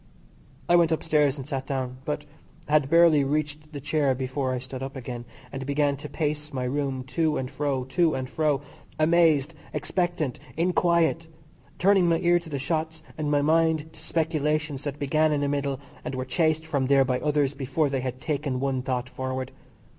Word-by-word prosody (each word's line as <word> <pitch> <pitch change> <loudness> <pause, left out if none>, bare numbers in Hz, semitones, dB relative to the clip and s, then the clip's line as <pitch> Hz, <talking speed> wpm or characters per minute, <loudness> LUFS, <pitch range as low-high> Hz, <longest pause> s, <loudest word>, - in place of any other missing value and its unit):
I 175 - +5
went 170 -1 +4
upstairs 150 -3 +2
and 135 -1 -7
sat 135 -3 -3
down, 130 -2 -3
but 150 0 -3 0.4
had 150 -2 +3
barely 165 -3 +6
reached 150 +2 -2
the 145 - -6
chair 145 -1 +1
before 130 +1 -2
I 130 - -1
stood 130 +1 -7
up 135 +1 -5
again, 120 -2 -6 0.3
and 135 - -5
began 140 +1 +1
to 145 - -8
pace 150 -1 -2
my 130 -2 -3
room, 135 0 -1
to 160 -1 +1
and 130 0 -3
fro, 135 -2 -1
to 170 +2 +2
and 130 -1 -3
fro; 150 0 0 0.4
amazed, 160 -2 +4 0.2
expectant, 155 -2 -1 0.2
inquiet; 170 -1 +2 0.5
turning 190 -2 +4
my 165 - +3
ear 175 0 +3
to 170 -1 -11
the 145 - -2
shots, 160 +3 -2
and 155 -1 -2
my 145 -1 +2
mind 160 0 +2
to 155 - -15
speculations 155 -3 -1
that 145 -1 -3
began 155 +2 +2
in 145 -1 +1
the 145 - +1
middle, 140 -1 -1 0.2
and 130 - -4
were 130 0 -3
chased 155 +4 +1
from 140 -5 0
there 135 -1 +5
by 125 -1 0
others 145 -2 +1
before 140 +2 0
they 135 -1 -1
had 130 0 -4
taken 145 -3 -2
one 135 -1 0
thought 125 -1 -2
forward. 130 0 -4
145 Hz, 185 wpm, -26 LUFS, 135-160 Hz, 0.5 s, barely